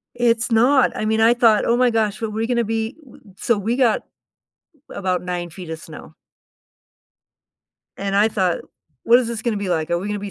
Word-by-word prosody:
It's 240 0 +1
not. 245 +4 +3
I - - -3
mean, 220 +1 +1
I 230 +2 +5
thought, 230 -3 +3
"Oh 235 - +2
my 250 0 +3
gosh, 215 -2 0
but 225 -1 -3
we 220 +2 -2
gonna 235 -1 0
be 225 +3 -3
w 270 -6 -17
w" 195 -3 -20
So, 235 - +1
we 220 +4 -1
got 250 -4 +2 0.9
about 185 -2 -2
9 175 -1 -4
feet 175 0 -10
of 160 0 -5
snow - - -12 1.8
and 195 0 -3
I 210 +2 +4
thought, 185 -5 0 0.5
"What 235 +1 +6
is 250 -2 -2
this 230 -2 -5
gonna 230 -3 -1
be 200 -1 -4
like? 160 -2 -1
Are 170 - +1
we 190 - -6
gonna 210 0 -3
be 200 0 -6
220 Hz, 210 wpm, -20 LUFS, 195-235 Hz, 1.8 s, What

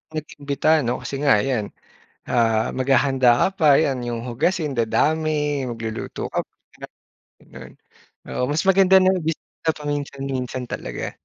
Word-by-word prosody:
nag-imbita 145 -1 -3 0.2
'no? 125 +2 -2
Kasi 125 +3 -5
nga 145 - +5
yan, 120 -6 0 0.6
ah, 115 -2 +2
maghahanda 130 0 +2
ka - - +4
pa, 155 - +3 0.2
yan, 135 -4 0
yung 115 -1 -3
hugasin 150 +4 -1
dadami, 150 +4 0
magluluto 115 -1 -5
ka - - 0
pa, - - -66 0.9
ganun. - - -13 0.5
Oo, - - -3
mas 155 - 0
maganda 190 0 +5
na 185 0 +4
bumisita 160 0 -3
paminsan-minsan 135 -3 -4
talaga. - - -5
140 Hz, 130 wpm, -22 LUFS, 120-155 Hz, 0.9 s, nga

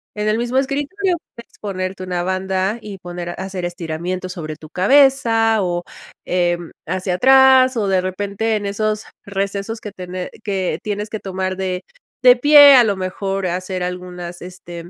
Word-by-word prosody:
En 210 0 -2
el 215 +1 +2
mismo 240 +2 -1
escritorio 290 +8 0 0.2
puedes 235 - -14
ponerte 185 -2 -4
una 180 -1 -2
banda 190 +2 -1
y 205 -3 -8
poner 175 -1 -6
a - - -4
hacer 190 -1 -5
estiramiento 175 +1 -4
sobre 155 -4 -6
tu 155 0 -13
cabeza, 225 - +4
o 175 -2 -1 0.4
eh, 175 -1 +1 0.3
hacia 185 +1 -2
atrás 265 +2 +6
o 210 -3 0
de 190 -1 +2
repente, 200 +4 -2
en 205 -1 -3
esos 215 +1 -2 0.2
recesos 200 +2 -3
que 210 - -8
tene 180 -1 -6
que 190 -5 -2
tienes 210 0 -3
que 215 - -5
tomar 190 -1 -3
de 185 -1 -3 0.4
de 250 -1 +8
pie 290 +1 +8
a 250 - +7
lo 205 -2 +1
mejor 195 +1 -3
hacer 185 +1 -3
algunas, 180 -1 -6
este, 175 -1 -9
190 Hz, 165 wpm, -19 LUFS, 180-220 Hz, 0.4 s, de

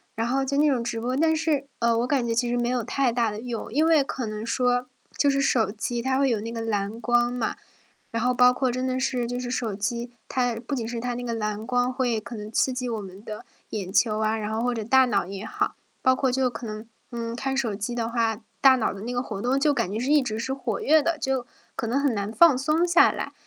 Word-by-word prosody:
然 225 +1 -1
后 270 +2 +1
就 280 +1 -2
那 300 0 +4
种 255 -4 +1
直 230 -1 -3
播。 250 +3 -1
但 320 +1 +3
是 305 -3 0
呃， 235 -1 +2
我 245 - 0
感 270 -4 +1
觉 230 - 0
其 240 +1 +1
实 245 - 0
没 240 0 0
有 250 -2 0
太 255 +2 +1
大 230 -1 +1
的 210 +1 -6
用。 235 -2 -5
因 305 +3 +3
为 320 -3 +5
可 255 - -4
能 215 0 -5
说 245 +1 +1 0.3
就 285 - +4
是 275 0 +2
手 235 -5 +2
机 235 +2 -3
它 260 +2 0
会 275 - +3
有 230 -3 +1
那 225 +2 -5
个 230 -1 -4
蓝 215 0 -2
光 240 0 +2
嘛， 245 -3 -2 0.6
然 230 -1 -1
后 250 0 +2
包 250 0 +6
括 255 0 0
真 255 +1 -2
的 255 0 -1
是 250 -2 0
就 245 +1 -3
是 245 -1 -4
手 230 -5 -2
机 235 +4 -3 0.2
它 245 -2 0
不 235 +5 -6
仅 235 -5 -2
是 235 0 -4
它 245 +1 -2
那 245 +1 -5
个 235 -1 -2
蓝 215 -1 -3
光 250 0 +1
会 245 -4 0
可 235 +2 -9
能 210 0 -7
刺 260 +3 +1
激 250 -1 -3
我 225 -2 -2
们 195 +1 -11
的 215 -1 -8 0.2
眼 195 -4 -4
球 215 -1 +3
啊， 220 0 +1
然 215 0 -3
后 220 +1 -1
或 245 0 +1
者 225 -2 -3
大 260 +4 +5
脑 205 -7 +1
也 195 +2 -6
好。 - - -2 0.3
包 260 0 +4
括 260 -1 +1
就 260 0 +1
可 245 0 -8
能， 215 +1 -6 0.2
嗯， 230 -1 -4
看 270 +2 -2
手 240 -6 0
机 210 +4 -4
的 230 -1 -2
话， 230 -2 0 0.2
大 265 -1 +7
脑 230 - 0
的 195 - -9
那 240 +3 -4
个 245 - 0
活 215 -6 -6
动 255 +4 +1
就 290 +1 +3
感 190 - -1
觉 215 - -2
是 250 +4 -2
一 295 -2 +5
直 220 -3 -3
是 260 +3 -2
活 245 -6 -3
跃 310 +1 +4
的， 335 +1 0
就 265 -3 -1 0.3
可 - - -3
能 240 +5 +1
很 280 -4 +1
难 205 +1 -2
放 285 +3 +6
松 305 +6 +1
下 345 0 +6
来。 - - -5
245 Hz, 290 characters per minute, -25 LUFS, 225-260 Hz, 0.6 s, 大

